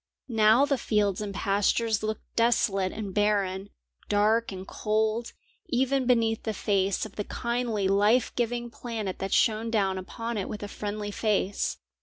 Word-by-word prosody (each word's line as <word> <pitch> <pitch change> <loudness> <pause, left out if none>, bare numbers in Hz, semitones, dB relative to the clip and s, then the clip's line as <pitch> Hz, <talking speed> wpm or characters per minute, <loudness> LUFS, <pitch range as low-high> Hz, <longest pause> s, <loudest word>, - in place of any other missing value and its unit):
Now 225 +2 +5
the 280 -2 0
fields 205 -2 +1
and 205 -1 -3
pastures 205 +3 +1
looked 215 0 -3
desolate 200 -5 +2
and 205 -3 -5
barren, 200 -2 +1 0.4
dark 215 +3 +2
and 190 0 -7
cold, 220 +2 -1 0.3
even 265 +1 +1
beneath 225 -3 +2
the 220 -2 -3
face 195 -1 +1
of 215 - -11
the 205 - -1
kindly 235 -3 -1
life 210 +5 +3
giving 240 0 -1
planet 225 -6 -5
that 195 0 -3
shone 225 0 +2
down 195 -4 +1
upon 230 +4 -4
it 190 - -4
with 210 - -6
a - - -4
friendly 205 0 -4
face. 205 -2 0
215 Hz, 155 wpm, -27 LUFS, 200-230 Hz, 0.4 s, Now